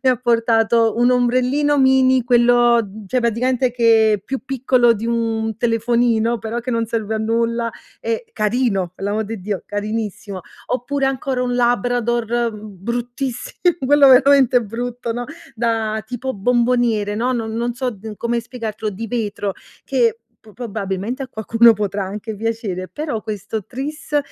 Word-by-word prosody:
mi 260 - +4
ha 250 - +2
portato 230 -1 +2
un 245 +1 +4
ombrellino 255 +4 +2
mini, 260 -1 +4
quello 240 -1 +4
mhmm, 205 0 -10
cioè, 255 +4 0
praticamente 245 +2 +1
che 225 -3 +3
più 270 -1 -4
piccolo 255 -2 +3
di 225 +1 -4
un 225 -2 -1
telefonino, 235 0 +1
però 225 +2 -4
che 250 +2 -5
non 230 -1 0
serve 220 -1 -2
a 220 - -1
nulla, 230 +1 0 0.3
e 460 +1 -2
carino, 210 -5 0
pe 195 - -13
l'amor 210 +2 -1
di 220 -1 -6
Dio, 195 -2 -3
carinissimo. 205 -2 -4 0.3
Oppure, 270 +2 -1
ancora 265 -1 -1
un 245 -1 -1
labrador, 240 -1 +1 0.3
mhmm, 210 - -9 0.2
bruttissi 245 +2 -3 0.4
quello 285 0 +6
veramente 260 -2 +6
brutto, 235 +2 -4
no, 245 +1 -4 0.3
da 220 -2 -1
tipo 255 +1 -4
bomboniere, 235 -1 +1
no, 245 +4 0
non 225 -2 -2
non 235 +1 -2
so 255 0 -2
n 215 0 -9
come 235 +2 -1
spiegartelo, 225 -3 -5
di 220 +4 -6
vetro, 205 -3 -2 0.3
che 235 -4 +1 0.2
p 215 -1 -16
probabilmente 220 +1 -4
a 265 - -6
qualcuno 230 0 +4
potrà 205 -2 -2
anche 210 +3 -6
piacere, 210 -4 -3
però 295 -8 -4
questo 215 0 -5
tris, 295 +5 -3
235 Hz, 155 wpm, -20 LUFS, 220-250 Hz, 0.4 s, quello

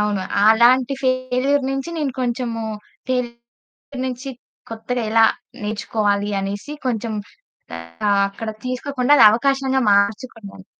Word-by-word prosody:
అవును. 210 -2 0 0.2
అలాంటి 245 +4 +5
ఫెయిల్యూర్ 255 +2 +1
నుంచి, 270 +4 -3
నేను 285 -4 -1
కొంచెము 235 -2 -2 0.4
తెల్ 250 -2 0 0.7
నుంచి 260 +1 -5 0.4
కొత్తగా 230 +2 -3
ఎలా 225 0 +5 0.4
నేర్చుకోవాలి 210 -1 -1
అనేసి 200 +9 -5
కొంచెం 230 -2 -2 1.0
ఆహ్, 200 -1 +3
అక్కడ 210 +3 -7 0.2
తీసుకోకుండా 255 +1 -1
అది - - +7
అవకాశంగా 265 +3 +1
మార్చుకున్నాను. 200 0 -1
240 Hz, 105 wpm, -20 LUFS, 215-260 Hz, 1.0 s, అది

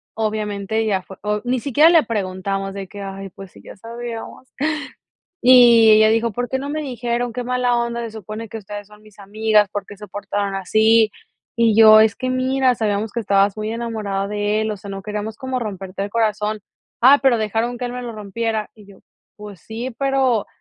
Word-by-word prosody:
Obviamente 215 0 -2
ya 195 -3 0
fue 190 - -12
o 210 0 -1
ni 250 +1 0
siquiera 290 +5 +4
le 330 -3 +5
preguntamos 195 -2 -3
de 195 -1 -6
que: 205 - -10
"Ay, 195 0 -7
pues, 190 +1 -12
sí - - -16
ya - - -11
sabíamos". 235 +3 -8 0.9
Y 240 -3 +7
ella 215 0 +6
dijo: 225 0 +1
"¿Por 245 +4 -3
qué 265 - -1
no 280 +2 -5
me 310 +1 -3
dijeron? 240 -2 -3
Qué 245 +2 -4
mala 250 0 +1
onda, 235 0 -2
se 230 - -5
supone 220 +1 -8
que 225 - -6
ustedes 205 0 -9
son 210 0 -17
mis 215 -1 -20
amigas, 210 +1 +2
¿por 205 -2 -5
qué 205 - -11
se 210 +1 -10
portaron 205 0 -3
así?". 220 +3 +3 0.5
Y 230 -2 +3
yo: 215 -1 +9
"Es 220 -1 +3
que 255 - -3
mira, 255 0 +1
sabíamos 210 -1 -2
que 235 - -2
estabas 200 -1 +2
muy 215 0 -3
enamorada 215 -4 -3
de 210 +1 -1
él, 220 0 -1
o - - -6
sea, 200 +1 -10
no 195 0 -6
queríamos 210 +1 -5
como 260 -1 -3
romperte 195 -3 -5
el 205 - -6
corazón. 215 -1 -1 0.4
'Ah, 270 +4 +7
pero 260 -4 +4
dejaron 225 +3 -2
que 250 - -4
él 245 - -5
me 250 - -6
lo 235 -1 -6
rompiera'". 215 +1 -3
Y 210 -2 -17
yo: 200 -1 -16 0.4
"Pues 205 -4 -11
sí, 230 +5 -6
pero". 265 -5 +1
220 Hz, 205 wpm, -20 LUFS, 205-235 Hz, 0.9 s, yo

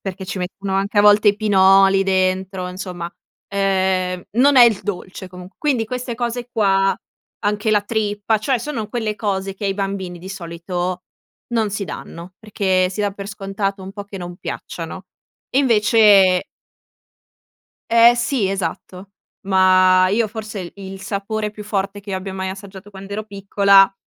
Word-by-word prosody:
perché 190 0 -6
ci 195 - -5
mettono 190 +2 -4
anche 200 +2 0
a - - +8
volte 210 0 +6
i 200 - +3
pinoli 195 -2 +5
dentro, 185 -1 0
insomma, 180 -2 -6 0.4
ehm, 190 -2 0
non 265 +5 +4
è 245 - +10
il 225 -4 +3
dolce 190 -1 -6
comunque, 180 +1 -12
quindi 270 -7 0
queste 250 0 -4
cose 240 0 -3
qua, 195 -3 +2 0.5
anche 210 +1 0
la 210 -1 +4
trippa, 210 0 -1
cioè 250 +4 0
sono 230 -5 -4
quelle 220 -3 -2
cose 195 -2 -2
che 200 - -7
ai 195 - +1
bambini 195 -3 -4
di 185 - -10
solito 180 0 -4 0.5
non 220 -2 +1
si 200 0 -3
danno, 170 +2 -9
perché 190 -4 0
si 195 - -5
dà 205 -1 +1
per 200 0 -8
scontato 195 -1 -4
un 190 - -8
po' 205 0 -7
che 200 -1 -9
non 175 -1 -7
piacciano, - - -7 0.5
invece 210 -7 +5 1.4
Eh 230 +1 +6
sì, 240 -3 0
esatto, 190 +1 -5 0.4
ma 185 -1 +5
io 220 +2 +1
forse 215 -1 -7
il 175 -2 -7
il 195 -1 -9
sapore 210 +2 -3
più 210 0 -9
forte 205 -1 -3
che 200 0 -9
io - - -1
abbia 190 0 -6
mai 190 0 -3
assaggiato 195 +1 -10
quand'ero 200 +2 -7
piccola 200 -1 +4
195 Hz, 160 wpm, -20 LUFS, 190-210 Hz, 1.4 s, è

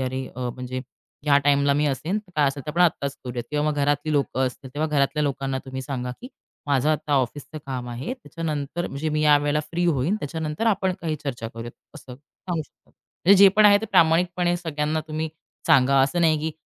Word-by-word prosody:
"अरे 130 0 -3
अ, 125 -1 -2
म्हणजे 130 0 -5 0.4
ह्या 145 -1 +5
टाईमला 140 0 +4
मी 150 +1 +2
असेन 160 - -1
तर 205 -4 -15
काय 150 - +4
असेलतर 140 +2 -5
आपण 170 +3 -2
आत्ताच 140 -5 +1
करूया" 120 -1 -4
किंवा 150 0 0
मग 150 - -4
घरातली 145 +1 0
लोकं 130 -2 +1
असतील, 130 +1 -7
तेव्हा 155 +2 -1
घरातल्या 150 +1 +1
लोकांना 135 -1 -1
तुम्ही 130 0 -6
सांगा, 125 -2 -4
की 250 - -9 0.4
माझं 140 0 +2
आता 150 -1 -1
ऑफिसच 140 +4 -2
काम 125 -2 -4
आहे. 120 - -4
त्याच्यानंतर 165 - -4
म्हणजे 150 +3 -3
मी 150 0 0
यावेळेला 145 0 +3
फ्री 175 +1 -1
होईन. 155 +3 +1
त्याच्यानंतर 155 +6 -3
आपण 195 -3 +2
काही 160 -2 -2
चर्चा 120 -5 -4
करूयात 115 +1 -8 0.2
असं 135 -5 -10
सांगू 160 +4 -6
शकतो. - - -27
म्हणजे 195 +3 +1
जे 195 - +10
पण 215 - +6
आहे 205 0 +7
ते 220 - -4
प्रामाणिकपणे 175 +2 +3
सगळ्यांना 155 -2 -2
तुम्ही 155 +1 -2 0.4
सांगा. 135 -3 +5
असं 140 +6 0
नाही, 160 -2 +3
की 160 +1 -2
145 Hz, 200 wpm, -24 LUFS, 135-160 Hz, 0.4 s, जे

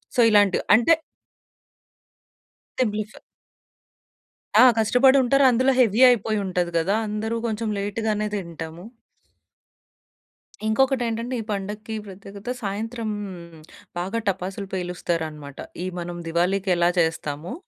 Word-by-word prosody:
So, 245 - +4
ఇలాంటివి. 205 -3 +4
అంటే 240 +9 +5 1.9
సింప్లిఫ 215 -2 -2 1.5
ఆ! - - +9
కష్టపడుంటారు. 260 +4 +4
అందులో 260 +3 +3
హెవీ 230 0 +3
అయిపోయుంటది 195 -6 0
కదా! 190 +6 +1
అందరూ 220 +2 -2
కొంచెం 220 0 -2
లేట్ 205 +2 -3
గానే 210 0 0
తింటాము. 170 -2 -7 1.8
ఇంకొకటేంటంటే 240 0 0
ఈ - - -7
పండక్కి 210 +2 -5
ప్రత్యేకత 195 +3 -10
సాయంత్రం 220 +3 -3 0.9
బాగా 190 +6 -2
టపాసులు 195 +1 -3
పేలుస్తారనమాట. 165 -5 -4 0.3
ఈ - - -3
మనం 175 0 -5
దివాళీకెలా 175 +1 +1
చేస్తామో, 160 - -2
205 Hz, 90 wpm, -23 LUFS, 180-230 Hz, 1.9 s, ఆ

